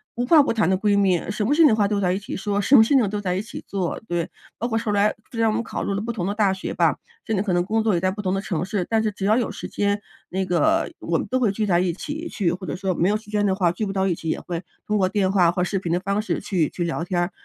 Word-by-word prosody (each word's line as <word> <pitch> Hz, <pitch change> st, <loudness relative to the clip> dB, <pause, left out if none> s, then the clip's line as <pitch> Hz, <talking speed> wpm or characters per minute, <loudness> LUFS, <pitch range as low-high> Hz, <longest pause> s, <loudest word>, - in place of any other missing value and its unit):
无 245 Hz, +1 st, -1 dB
话 310 Hz, -1 st, +7 dB
不 -, -, 0 dB
谈 200 Hz, -6 st, +2 dB
的 190 Hz, -, +2 dB
闺 205 Hz, 0 st, +2 dB
蜜， 185 Hz, -3 st, +3 dB
什 210 Hz, 0 st, -2 dB
么 285 Hz, -, +2 dB
事 330 Hz, -, +4 dB
情 310 Hz, -, +9 dB
的 215 Hz, -, +3 dB
话 205 Hz, -2 st, +2 dB
都 205 Hz, -1 st, 0 dB
在 180 Hz, -1 st, +2 dB
一 190 Hz, -, -1 dB
起 205 Hz, -, -6 dB
说， 205 Hz, 0 st, -1 dB
什 270 Hz, +8 st, +4 dB
么 220 Hz, -, +9 dB
事 255 Hz, -, +1 dB
情 235 Hz, -6 st, +4 dB
都 210 Hz, 0 st, -3 dB
在 180 Hz, -2 st, -1 dB
一 190 Hz, -, -1 dB
起 215 Hz, -, -9 dB
做， 185 Hz, -4 st, -2 dB
对。 175 Hz, -1 st, -2 dB, 0.3 s
包 235 Hz, -, -1 dB
括 225 Hz, -2 st, -1 dB
后 215 Hz, -, -2 dB
来 205 Hz, +1 st, +2 dB, 0.2 s
虽 230 Hz, -, -6 dB
然 225 Hz, -, +4 dB
我 -, -, 0 dB
们 230 Hz, -, -1 dB
考 -, -, -4 dB
入 200 Hz, -, -1 dB
了 200 Hz, -, -2 dB
不 235 Hz, +2 st, -3 dB
同 185 Hz, -6 st, -3 dB
的 200 Hz, -, -1 dB
大 205 Hz, -3 st, +2 dB
学 190 Hz, -, -5 dB
吧， -, -, +2 dB, 0.3 s
现 220 Hz, -2 st, -1 dB
在 195 Hz, -, +1 dB
可 190 Hz, -4 st, -1 dB
能 175 Hz, 0 st, +2 dB
工 220 Hz, +3 st, 0 dB
作 215 Hz, -3 st, +2 dB
也 170 Hz, -, +2 dB
在 185 Hz, +1 st, +1 dB
不 205 Hz, +2 st, -4 dB
同 185 Hz, 0 st, 0 dB
的 195 Hz, -, -1 dB
城 175 Hz, -4 st, -2 dB
市。 190 Hz, -2 st, -1 dB
但 225 Hz, -1 st, +2 dB
是 215 Hz, -, 0 dB
只 195 Hz, -1 st, -5 dB
要 215 Hz, +3 st, +4 dB
有 245 Hz, -, -1 dB
时 -, -, -7 dB
间， 205 Hz, 0 st, -1 dB, 0.3 s
那 190 Hz, +1 st, -1 dB
个 310 Hz, -, +1 dB
我 -, -, -1 dB
们 -, -, -4 dB
都 255 Hz, -, 0 dB
会 225 Hz, -6 st, +2 dB
聚 210 Hz, +1 st, -2 dB
在 175 Hz, -2 st, +3 dB
一 180 Hz, -2 st, 0 dB
起 315 Hz, -, -5 dB
去 180 Hz, -5 st, 0 dB
或 185 Hz, +1 st, -5 dB
者 -, -, -3 dB
说 190 Hz, -1 st, -2 dB
没 175 Hz, +4 st, +2 dB
有 210 Hz, -, +2 dB
时 215 Hz, -1 st, -16 dB
间 210 Hz, -1 st, +1 dB
的 195 Hz, -, +2 dB
话， 180 Hz, -3 st, +2 dB
聚 210 Hz, +5 st, -3 dB
不 195 Hz, -, -4 dB
到 190 Hz, 0 st, +1 dB
一 175 Hz, -, +1 dB
起， 165 Hz, -, -8 dB
也 -, -, -1 dB
会 175 Hz, 0 st, -5 dB, 0.2 s
通 210 Hz, 0 st, +1 dB
过 185 Hz, -2 st, +3 dB
电 195 Hz, -1 st, +1 dB
话 175 Hz, -4 st, +4 dB
和 180 Hz, 0 st, -1 dB
视 195 Hz, +2 st, -1 dB
频 175 Hz, -3 st, -3 dB
的 175 Hz, -, +2 dB
方 200 Hz, +2 st, -1 dB
式 215 Hz, -, -1 dB
去 175 Hz, -6 st, 0 dB
去 175 Hz, -, -3 dB
聊 165 Hz, 0 st, -2 dB
天 175 Hz, 0 st, -1 dB
儿， 175 Hz, -, -1 dB
200 Hz, 370 characters per minute, -23 LUFS, 185-215 Hz, 0.3 s, 情